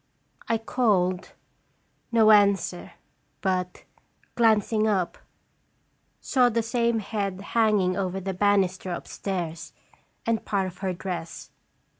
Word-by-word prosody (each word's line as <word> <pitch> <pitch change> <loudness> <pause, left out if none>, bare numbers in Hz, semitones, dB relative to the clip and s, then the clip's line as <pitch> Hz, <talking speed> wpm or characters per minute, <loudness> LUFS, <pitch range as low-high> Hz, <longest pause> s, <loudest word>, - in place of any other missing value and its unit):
I 230 - +2
called, 200 -6 0 0.8
no 220 -2 +5
answer, 200 -3 +3 0.5
but, 185 -2 -2 0.5
glancing 220 -1 +3
up, 190 -5 0 1.0
saw 250 -3 +3
the 230 0 0
same 235 0 +1
head 200 -3 -3
hanging 210 -5 +3
over 190 -1 -2
the 190 0 -4
ban 205 +1 +3
isters 180 -1 -5
upstairs, 175 -5 -5 0.5
and 230 -1 0
part 195 -2 0
of 180 -1 -8
her 190 -1 -1
dress. 175 -2 -6
200 Hz, 110 wpm, -26 LUFS, 185-220 Hz, 1.0 s, no